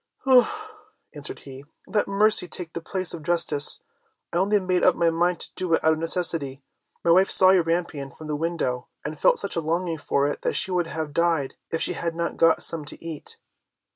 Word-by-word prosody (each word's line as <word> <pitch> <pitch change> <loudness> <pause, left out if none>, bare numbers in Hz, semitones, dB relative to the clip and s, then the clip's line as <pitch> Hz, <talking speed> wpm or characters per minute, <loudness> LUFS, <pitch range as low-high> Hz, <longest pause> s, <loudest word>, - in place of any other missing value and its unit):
"Ah," 425 - +2 0.3
answered 145 -1 -8
he, 135 0 -11 0.2
"let 210 - -1
mercy 200 -1 +3
take 170 0 -8
the 170 - -5
place 185 +1 -4
of 165 - -7
justice, 150 -3 +2 0.5
I - - 0
only 205 +3 +2
made 185 -2 -1
up 185 - +4
my 170 -1 +2
mind 175 +2 0
to - - -6
do 180 -3 +1
it - - -4
out 160 - +4
of 155 - -4
necessity. 160 -5 +1 0.4
My 170 - +3
wife 190 +3 +4
saw 185 0 +7
your 190 -2 +4
rampion 165 -4 -3
from 155 - -13
the 150 -1 -3
window, 150 -6 -3 0.2
and 150 0 -6
felt - - +4
such 200 - -3
a 170 - -1
longing 165 +1 -2
for 140 0 0
it 145 - -4
that - - -1
she 190 - -1
would 175 -2 0
have 160 -2 -5
died 165 -5 0 0.2
if 165 - 0
she - - +1
had 170 -1 -4
not 170 0 -3
got 165 0 +3
some 165 -2 +2
to 145 - -9
eat." 160 -3 -8
170 Hz, 215 wpm, -24 LUFS, 155-185 Hz, 0.5 s, saw